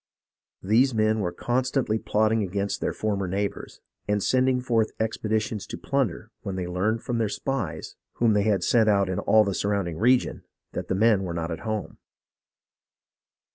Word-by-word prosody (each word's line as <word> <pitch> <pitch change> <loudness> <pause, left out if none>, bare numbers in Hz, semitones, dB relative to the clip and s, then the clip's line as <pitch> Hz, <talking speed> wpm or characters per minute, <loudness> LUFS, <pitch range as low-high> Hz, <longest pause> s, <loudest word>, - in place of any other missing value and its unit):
These 115 +6 +3
men 110 0 +2
were 90 -4 -1
constantly 125 +2 0
plotting 110 +1 +1
against 100 +1 -2
their - - 0
former 100 -3 -2
neighbours, 100 +2 -4 0.3
and 105 -1 +1
sending 130 0 +2
forth 115 -3 0
expedi 110 0 0
tions 105 -2 -5
to - - -6
plunder 135 -9 -2
when 95 - -4
they 90 -1 -3
learned 95 +6 -1
from 120 -2 -2
their 110 -2 +1
spies, 125 - -3 0.2
whom 115 -2 +2
they 105 - +3
had 100 -3 +1
sent 110 +1 +4
out 100 -2 +3
in 95 - -1
all 110 0 +4
the 100 -2 -1
surrounding 100 -5 -1
region, 125 +3 +2 0.3
that - - -5
the - - 0
men 110 0 +4
were 90 -3 -4
not 85 0 -3
at 80 - -4
home. 110 -2 -4
110 Hz, 175 wpm, -25 LUFS, 100-115 Hz, 0.3 s, sent